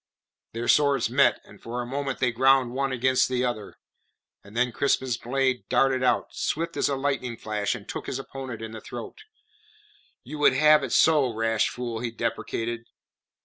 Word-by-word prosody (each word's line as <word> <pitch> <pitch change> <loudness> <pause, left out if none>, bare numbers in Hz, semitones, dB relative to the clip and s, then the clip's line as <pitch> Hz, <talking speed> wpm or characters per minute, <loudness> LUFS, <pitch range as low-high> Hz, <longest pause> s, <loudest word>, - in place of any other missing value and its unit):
Their 115 +1 -4
swords 140 -3 +3
met, - - +4
and - - -17
for 120 +2 -5
a 120 - -3
moment 135 +1 -3
they 125 -2 +1
ground 130 +1 +3
one 135 +1 -1
against 130 +1 +2
the 125 0 0
other; 110 -4 -4 0.7
then 120 +5 -1
Crispin's 130 -1 0
blade 130 +1 -1
darted 130 +1 +2
out, 125 - +1
swift 165 +2 -2
as - - +1
a 140 - 0
lightning 135 -3 -2
flash, 105 -2 -2
and - - -10
took - - -6
his - - -3
opponent 135 -4 -7
in 110 - -6
the 110 -1 -8
throat. 120 - -9 1.0
"You 150 +4 -8
would 145 -2 +5
have 150 +2 +5
it - - -4
so, 150 -6 +4
rash 115 0 +1
fool," 120 -2 -5
he 120 0 -3
deprecated. 115 0 -3
125 Hz, 175 wpm, -26 LUFS, 115-135 Hz, 1.0 s, would